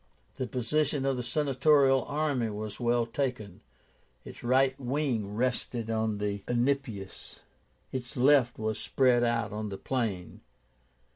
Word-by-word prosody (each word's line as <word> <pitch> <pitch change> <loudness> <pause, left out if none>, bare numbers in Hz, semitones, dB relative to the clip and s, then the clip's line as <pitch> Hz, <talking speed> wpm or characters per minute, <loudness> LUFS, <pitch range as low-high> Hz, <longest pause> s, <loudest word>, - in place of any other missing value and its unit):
The 130 - -2
position 135 +4 0
of 135 -1 +1
the 125 - -3
Senatorial 135 +1 +3
army 145 -6 -1
was 105 0 -6
well 120 -1 +2
taken. 115 -6 -3 0.6
Its - - -11
right 130 +2 +3
wing 125 -6 -1
rested 120 -1 -1
on 110 -1 0
the 100 -1 -2
Enipeus, 120 -5 -2 0.5
its 125 -1 -6
left 130 -2 +4
was 110 0 -2
spread 125 -2 +3
out 115 -3 0
on 105 0 -4
the 95 - -5
plain. 105 -10 -3
120 Hz, 130 wpm, -29 LUFS, 110-135 Hz, 0.6 s, left